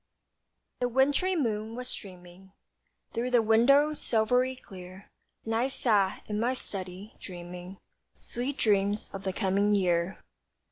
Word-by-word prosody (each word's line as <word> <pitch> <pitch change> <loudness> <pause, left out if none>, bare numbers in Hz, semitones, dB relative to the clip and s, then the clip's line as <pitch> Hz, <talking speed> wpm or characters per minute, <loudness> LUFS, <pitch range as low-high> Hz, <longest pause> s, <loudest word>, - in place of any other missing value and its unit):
The 245 - +1
wintry 285 +9 +2
moon 220 -6 -1
was 250 +1 -5
streaming 185 0 -9 0.6
Through 240 +2 -1
the 245 -2 +4
window, 275 +7 +5
silvery 250 0 +1
clear, 185 -4 -12 0.4
And 225 - -2
I 235 +3 +2
sat 210 -7 +1
in 210 0 -2
my 240 +3 +1
study, 190 -2 -7
dreaming 180 +1 -8 0.4
Sweet 255 +4 -3
dreams 205 -1 +1
of 195 0 -7
the 190 - +1
coming 200 +2 +2
year. 180 -1 +1
210 Hz, 130 wpm, -29 LUFS, 190-250 Hz, 0.6 s, window